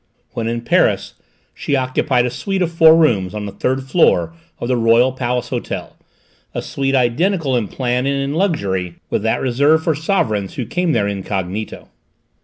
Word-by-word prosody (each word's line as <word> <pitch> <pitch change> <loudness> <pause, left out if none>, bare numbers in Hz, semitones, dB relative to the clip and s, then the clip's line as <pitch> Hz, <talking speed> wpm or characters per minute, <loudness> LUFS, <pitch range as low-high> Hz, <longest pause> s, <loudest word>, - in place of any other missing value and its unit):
When 115 -1 -3
in 115 0 -2
Paris - - +1 0.4
she 145 - -2
occupied 130 -1 +1
a 125 - -2
suite 190 +8 -2
of 170 - -2
four 160 -1 +6
rooms 105 - +2
on 105 -1 -4
the 100 - -5
third 130 +6 -1
floor 160 +3 +2 0.2
of 120 - -4
the 130 - +1
Royal 115 +2 +4
Palace 125 -1 -2
Hotel, - - -5 0.6
a - - -1
suite 135 0 -1
identical 135 +4 +1
in 115 -4 0
plan 125 +3 -1
and 140 0 0
in 140 +1 -2
luxury 100 - -1 0.2
with - - 0
that 110 +1 0
reserved 140 +5 +2
for 160 - +1
sovereigns 130 - -1
who 125 - -3
came 175 +7 -1
there 100 -6 +1
incognito. 100 +1 -4
125 Hz, 175 wpm, -18 LUFS, 110-150 Hz, 0.6 s, four